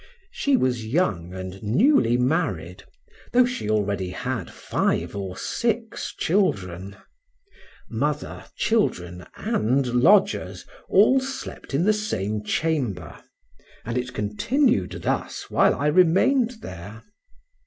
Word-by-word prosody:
She 280 -2 +1
was 125 - 0
young 105 - 0
and 95 +1 -7
newly 120 - +3
married, 125 - -1 0.5
though 250 0 +6
she 245 - -4
already 100 -3 0
had 95 - -4
five - - -1
or 95 -2 -5
six 230 -1 -2
children. 100 - -1 0.9
Mother, - - -3
children 90 - 0
and 130 +5 0 0.2
lodgers, 200 +8 +3 0.2
all 220 +7 +5
slept 265 - -6
in 155 - +2
the 215 +3 +4
same 110 - -2
chamber, 140 - -1 0.7
and 115 0 -3
it 125 0 -2
continued 235 - 0
thus - - -3
while - - +4
I 145 - -3
remained 220 - +3
there. 100 +5 -9
125 Hz, 110 wpm, -24 LUFS, -, 0.9 s, though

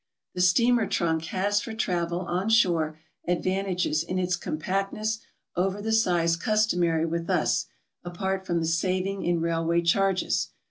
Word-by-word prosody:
The 180 - -2
steamer 230 +5 +4
trunk 160 -2 0
has 205 +4 0
for 225 - -6
travel 175 -4 -1
on 185 +3 -2
shore 170 -8 +3 0.3
advantages 180 -2 0
in 180 +3 -3
its 180 -1 +1
compactness 195 +6 -2 0.4
over 190 +3 0
the 220 +2 -2
size 175 -7 +3
customary 175 -5 +1
with 165 0 -3
us, - - +1 0.4
apart 190 +2 -3
from 170 -1 +1
the - - -1
saving 185 +4 -1
in 175 -1 +1
railway 165 0 +1
charges. 190 +2 +1
180 Hz, 140 wpm, -26 LUFS, 170-195 Hz, 0.4 s, steamer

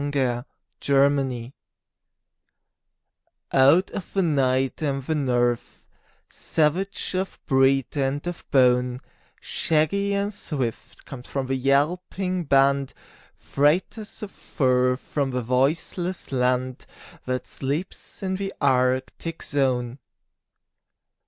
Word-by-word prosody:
THE 130 -3 -1 0.3
TRAIN 140 +1 +3
DOGS 120 0 -6 2.0
Out 145 +8 +5
of 190 - -6
the 195 - +2
night 135 -4 +1
and 140 -3 -1
the 160 - -1
north; 120 -5 -1 0.4
Savage 175 +8 -1
of 190 +1 -3
breed 135 0 +2
and 140 +1 -1
of 175 -1 -5
bone, 125 -1 +3 0.4
Shaggy 200 +6 +1
and 200 +1 -1
swift 135 - -5
comes 130 -3 -9
the 135 -1 -1
yelping 175 +7 0
band, 140 -1 +3 0.4
Freighters 185 - 0
of 200 - -6
fur 125 -2 +1
from 140 0 -2
the 125 -1 -2
voiceless 155 +9 -1
land 125 0 0 0.4
That 130 0 -2
sleeps 145 +9 -5
in 190 -1 -1
the 195 0 -4
Arctic 130 +4 0
zone. 130 -3 -1
140 Hz, 100 wpm, -24 LUFS, 130-165 Hz, 2.0 s, Out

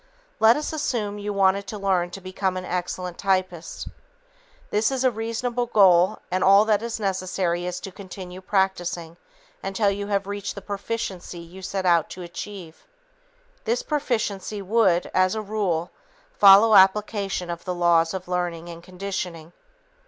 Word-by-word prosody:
Let 220 +3 +6
us 300 +1 -3
assume 220 -9 -2
you 205 0 -3
wanted 200 0 +2
to 215 - -5
learn 190 -3 +1
to 195 +2 -9
become 185 0 -2
an 185 - -5
excellent 180 0 -4
typist. 185 -4 -1 0.8
This 210 +1 +2
is 265 -1 -1
a 255 - +4
reasonable 230 +2 -2
goal 190 -3 +5
and 185 +1 +1
all 200 +2 +6
that 215 -1 +2
is 230 -1 -4
necessary 185 -3 -1
is 180 0 -4
to 195 - -7
continue 185 -1 -9
practicing 180 -4 -1 0.4
until 195 +1 0
you 200 0 -4
have 200 -1 0
reached 200 0 -5
the 200 - -7
proficiency 200 -3 -5
you 170 +3 -11
set 190 0 -3
out 170 -3 +3
to 180 - -8
achieve. 175 -1 -9 0.8
This 235 +2 0
proficiency 220 -8 -2
would, 195 -3 +2
as 185 +2 +3
a 220 - -2
rule, 195 -5 -1 0.4
follow 205 - +7
application 195 -2 +3
of 170 0 -6
the 180 -1 -2
laws 170 0 +3
of 185 -1 -6
learning 175 -2 -3
and 170 0 -9
conditioning. 180 -3 -6
190 Hz, 155 wpm, -24 LUFS, 180-210 Hz, 0.8 s, follow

